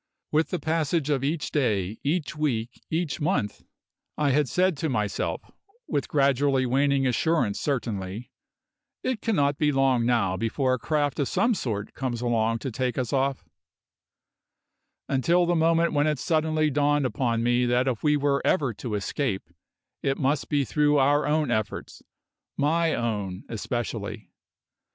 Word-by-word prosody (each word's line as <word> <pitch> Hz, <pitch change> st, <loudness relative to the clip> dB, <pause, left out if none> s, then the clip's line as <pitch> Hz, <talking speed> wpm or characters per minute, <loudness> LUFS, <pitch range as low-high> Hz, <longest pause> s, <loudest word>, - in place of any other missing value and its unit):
With 155 Hz, +2 st, +2 dB
the 180 Hz, -, -1 dB
passage 160 Hz, -2 st, 0 dB
of 135 Hz, -2 st, 0 dB
each 150 Hz, +2 st, -1 dB
day, 105 Hz, -8 st, 0 dB
each 150 Hz, +1 st, -1 dB
week, 125 Hz, -6 st, -2 dB
each 160 Hz, -3 st, -2 dB
month, 145 Hz, -, -1 dB, 0.6 s
I 145 Hz, -2 st, +2 dB
had 145 Hz, -1 st, +2 dB
said 185 Hz, -1 st, +2 dB
to 160 Hz, +2 st, -1 dB
myself 105 Hz, -6 st, -2 dB, 0.4 s
with 140 Hz, -, -1 dB
gradually 140 Hz, -1 st, +2 dB
waning 135 Hz, +2 st, +2 dB
assurance 130 Hz, -3 st, +1 dB
certainly 110 Hz, -5 st, -3 dB, 0.7 s
"It 255 Hz, -4 st, -1 dB
cannot 145 Hz, -11 st, +1 dB
be 150 Hz, -1 st, +3 dB
long 135 Hz, -3 st, +2 dB
now 100 Hz, -7 st, +1 dB
before 130 Hz, +4 st, 0 dB
a 130 Hz, -, -1 dB
craft 145 Hz, +1 st, 0 dB
of 140 Hz, -, +1 dB
some 235 Hz, +1 st, +2 dB
sort 110 Hz, -, -3 dB
comes 125 Hz, -3 st, -3 dB
along 115 Hz, -1 st, +1 dB
to 135 Hz, -, -2 dB
take 125 Hz, +1 st, -2 dB
us 130 Hz, -1 st, -2 dB
off," 135 Hz, 0 st, 0 dB, 1.6 s
until 170 Hz, +7 st, +2 dB
the 175 Hz, -, +1 dB
moment 165 Hz, 0 st, +2 dB
when 145 Hz, 0 st, +2 dB
it 150 Hz, -1 st, +1 dB
suddenly 155 Hz, +1 st, +1 dB
dawned 145 Hz, 0 st, +2 dB
upon 115 Hz, -1 st, 0 dB
me 120 Hz, +1 st, +2 dB
that 125 Hz, +2 st, +2 dB
if 125 Hz, -4 st, -1 dB
we 150 Hz, -1 st, +3 dB
were 140 Hz, -1 st, +1 dB
ever 140 Hz, -9 st, +1 dB
to 110 Hz, +1 st, -4 dB
escape, 100 Hz, -2 st, -2 dB, 0.5 s
it 135 Hz, 0 st, 0 dB
must 140 Hz, +1 st, 0 dB
be 145 Hz, -2 st, +1 dB
through 150 Hz, +1 st, +2 dB
our 145 Hz, +2 st, +3 dB
own 150 Hz, -3 st, +1 dB
efforts 110 Hz, -2 st, -3 dB, 0.6 s
my 160 Hz, +3 st, +2 dB
own 105 Hz, -5 st, -3 dB
especially. 120 Hz, +1 st, -4 dB
140 Hz, 150 wpm, -26 LUFS, 120-150 Hz, 1.6 s, be